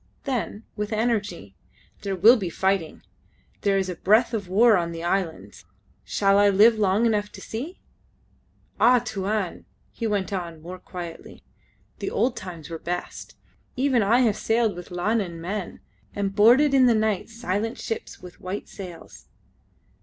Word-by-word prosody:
Then 240 Hz, -5 st, -3 dB
with 210 Hz, 0 st, -4 dB
energy: 210 Hz, -, -1 dB, 0.5 s
"There 195 Hz, -1 st, -2 dB
will 215 Hz, +7 st, +7 dB
be 195 Hz, -7 st, -3 dB
fighting. 190 Hz, -1 st, -1 dB, 0.6 s
There 200 Hz, -1 st, +2 dB
is 190 Hz, -1 st, 0 dB
a 180 Hz, -, -3 dB
breath 215 Hz, +7 st, +3 dB
of 205 Hz, -4 st, -3 dB
war 215 Hz, +5 st, +5 dB
on 170 Hz, -2 st, -1 dB
the 165 Hz, 0 st, -6 dB
islands. 175 Hz, -2 st, -3 dB, 0.4 s
Shall 195 Hz, 0 st, +2 dB
I 205 Hz, 0 st, +5 dB
live 215 Hz, +3 st, +5 dB
long 205 Hz, +2 st, +2 dB
enough 210 Hz, -2 st, 0 dB
to -, -, -10 dB
see?... 275 Hz, +12 st, -6 dB, 1.0 s
Ah, 250 Hz, +1 st, +6 dB
Tuan!" 205 Hz, -3 st, -3 dB, 0.3 s
he 230 Hz, -, -3 dB
went 205 Hz, -1 st, -1 dB
on, 170 Hz, -4 st, -4 dB
more 180 Hz, +3 st, -9 dB
quietly, 175 Hz, -3 st, -9 dB, 0.6 s
"the -, -, -3 dB
old 250 Hz, 0 st, 0 dB
times 175 Hz, -6 st, -8 dB
were 165 Hz, -1 st, -6 dB
best. 175 Hz, +2 st, -5 dB, 0.4 s
Even 260 Hz, -2 st, +2 dB
I 230 Hz, +5 st, +4 dB
have 220 Hz, -4 st, +2 dB
sailed 225 Hz, -3 st, +1 dB
with 175 Hz, 0 st, -9 dB
Lanun 180 Hz, -1 st, -1 dB
men, 185 Hz, +3 st, -5 dB, 0.3 s
and 200 Hz, -1 st, -2 dB
boarded 245 Hz, +8 st, +5 dB
in 260 Hz, -2 st, +6 dB
the 235 Hz, -, +4 dB
night 215 Hz, -2 st, 0 dB
silent 225 Hz, 0 st, -3 dB
ships 455 Hz, +1 st, -5 dB
with 180 Hz, -1 st, -12 dB
white 185 Hz, +3 st, -5 dB
sails. 180 Hz, -4 st, -11 dB
205 Hz, 155 wpm, -24 LUFS, 180-225 Hz, 1.0 s, will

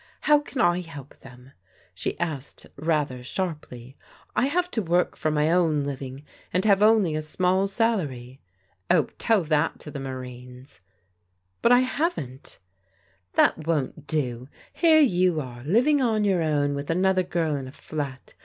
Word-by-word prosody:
'* -, -, -38 dB
How 295 Hz, -, +7 dB
can 290 Hz, -2 st, -7 dB
I 175 Hz, -2 st, +3 dB
help 145 Hz, -5 st, -11 dB
them?" 125 Hz, 0 st, -15 dB, 0.4 s
she 90 Hz, -, -4 dB
asked 155 Hz, -5 st, -5 dB
rather 145 Hz, -5 st, -1 dB
sharply. 135 Hz, -6 st, -5 dB, 0.4 s
"I 255 Hz, -, +2 dB
have 360 Hz, +4 st, -1 dB
to 225 Hz, -, 0 dB
work 175 Hz, -1 st, +1 dB
for 155 Hz, -, -1 dB
my 150 Hz, +1 st, +1 dB
own 165 Hz, -5 st, +2 dB
living, 135 Hz, 0 st, -6 dB, 0.3 s
and 185 Hz, +3 st, 0 dB
have 200 Hz, -2 st, +4 dB
only 210 Hz, -7 st, +4 dB
a 155 Hz, -, -1 dB
small 185 Hz, +5 st, +1 dB
salary." 155 Hz, -, -2 dB, 0.2 s
" 90 Hz, -, -40 dB
Oh, -, -, +3 dB
tell 220 Hz, -5 st, +2 dB
that 155 Hz, 0 st, +1 dB
to 150 Hz, -, -9 dB
the 140 Hz, -, -6 dB
Marines." 125 Hz, -4 st, -9 dB, 0.4 s
" 90 Hz, +1 st, -47 dB
But 235 Hz, -, +4 dB
I 245 Hz, 0 st, +7 dB
haven't." 255 Hz, -, -3 dB, 0.4 s
" 95 Hz, -2 st, -39 dB
That 155 Hz, 0 st, +3 dB
won't 150 Hz, -1 st, -2 dB
do. 130 Hz, -5 st, -2 dB, 0.2 s
Here 320 Hz, -2 st, +5 dB
you 180 Hz, -, +3 dB
are, 120 Hz, -4 st, -7 dB
living 250 Hz, -, +3 dB
on 220 Hz, -4 st, +1 dB
your 190 Hz, -4 st, +2 dB
own 145 Hz, -3 st, +1 dB
with 140 Hz, 0 st, -5 dB
another 185 Hz, +2 st, +2 dB
girl 170 Hz, -4 st, -1 dB
in 135 Hz, -2 st, -5 dB
a -, -, -9 dB
flat. 140 Hz, -3 st, -6 dB
155 Hz, 170 wpm, -25 LUFS, 130-190 Hz, 0.4 s, How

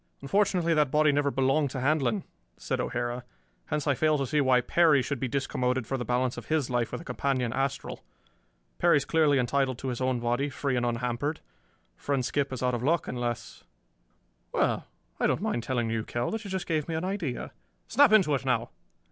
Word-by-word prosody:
"Unfortunately 180 Hz, +1 st, +2 dB
that 150 Hz, -4 st, +3 dB
body 150 Hz, +2 st, +4 dB
never 145 Hz, 0 st, +1 dB
belonged 135 Hz, +2 st, +1 dB
to 130 Hz, -, -5 dB
Handlon," 130 Hz, -5 st, +1 dB, 0.3 s
said -, -, -3 dB
O'Hara. 120 Hz, +1 st, -3 dB, 0.4 s
"Hence 150 Hz, -1 st, -2 dB
I 140 Hz, -, +3 dB
fail 155 Hz, +3 st, +2 dB
to 135 Hz, -, -1 dB
see 150 Hz, +3 st, +1 dB
why 130 Hz, -2 st, +4 dB
Perry 145 Hz, +2 st, +4 dB
should 140 Hz, -1 st, -3 dB
be 130 Hz, -, -2 dB
discommoded 125 Hz, -2 st, -1 dB
for 135 Hz, -, -2 dB
the 125 Hz, -, -2 dB
balance 125 Hz, +1 st, 0 dB
of -, -, -8 dB
his 155 Hz, -5 st, 0 dB
life 120 Hz, -2 st, 0 dB
with -, -, -4 dB
a -, -, -13 dB
companion 130 Hz, -8 st, -1 dB
astral. 135 Hz, 0 st, -3 dB, 0.8 s
Perry -, -, +5 dB
is 140 Hz, -, -1 dB
clearly 155 Hz, -3 st, +3 dB
entitled 130 Hz, 0 st, +1 dB
to 135 Hz, -, -4 dB
his 125 Hz, 0 st, -4 dB
own 130 Hz, -1 st, +1 dB
body, 120 Hz, +4 st, 0 dB
free 140 Hz, -1 st, -2 dB
and 120 Hz, 0 st, +1 dB
unhampered. 125 Hz, +5 st, -2 dB, 0.6 s
Friend 135 Hz, -, -1 dB
Skip 140 Hz, +1 st, -1 dB
is 130 Hz, -1 st, -4 dB
out 125 Hz, 0 st, +1 dB
of 120 Hz, -, -2 dB
luck, 160 Hz, +6 st, +1 dB
unless 120 Hz, -2 st, -4 dB, 0.9 s
Well, -, -, 0 dB, 0.3 s
I -, -, +3 dB
don't -, -, +1 dB
mind 120 Hz, -, -1 dB
telling 120 Hz, -1 st, -1 dB
you, 115 Hz, -1 st, -1 dB
Kell, 120 Hz, +2 st, -2 dB
that 225 Hz, 0 st, -3 dB
you 200 Hz, -, -7 dB
just 190 Hz, -1 st, -3 dB
gave 155 Hz, -3 st, -1 dB
me 165 Hz, -, -2 dB
an 160 Hz, +3 st, -2 dB
idea. 180 Hz, -11 st, -3 dB, 0.4 s
Snap 285 Hz, -2 st, +5 dB
into 195 Hz, -9 st, +5 dB
it 135 Hz, -, 0 dB
now!" -, -, 0 dB
135 Hz, 205 wpm, -28 LUFS, 125-150 Hz, 0.9 s, Perry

